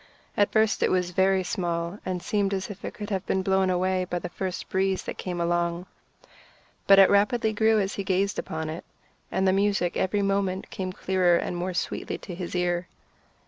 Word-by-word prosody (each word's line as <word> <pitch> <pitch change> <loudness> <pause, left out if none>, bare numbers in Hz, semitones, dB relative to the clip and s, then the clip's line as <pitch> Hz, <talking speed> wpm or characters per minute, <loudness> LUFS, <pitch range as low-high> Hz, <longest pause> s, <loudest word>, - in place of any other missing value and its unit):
At 205 - +2
first 220 -1 +2
it - - +3
was 180 -1 +1
very 190 +1 +3
small, 175 -1 -2
and 180 -2 -3
seemed 200 -1 0
as 190 +2 -4
if 200 - -11
it - - -5
could 210 0 -6
have 190 -1 -1
been 190 - 0
blown 190 0 +2
away 185 +1 +1
by 180 - -3
the 175 0 -5
first 185 0 -4
breeze 190 0 0
that - - -6
came 180 -2 -4
along; 170 +1 0 1.0
but 195 - +8
it 195 -1 +9
rapidly 220 +2 +2
grew 220 0 +3
as 195 0 -1
he 200 - -3
gazed 195 +1 0
upon 160 0 -4
it, 160 +2 -5 0.5
and 190 0 +1
the 185 - +4
music 195 -3 +1
every 200 +2 0
moment 195 -1 -1
came 185 -1 -4
clearer 180 -2 +2
and 180 - -3
more 180 +1 -3
sweetly - - -3
to 180 - -9
his 180 0 -5
ear. 175 0 0
190 Hz, 200 wpm, -26 LUFS, 180-195 Hz, 1.0 s, it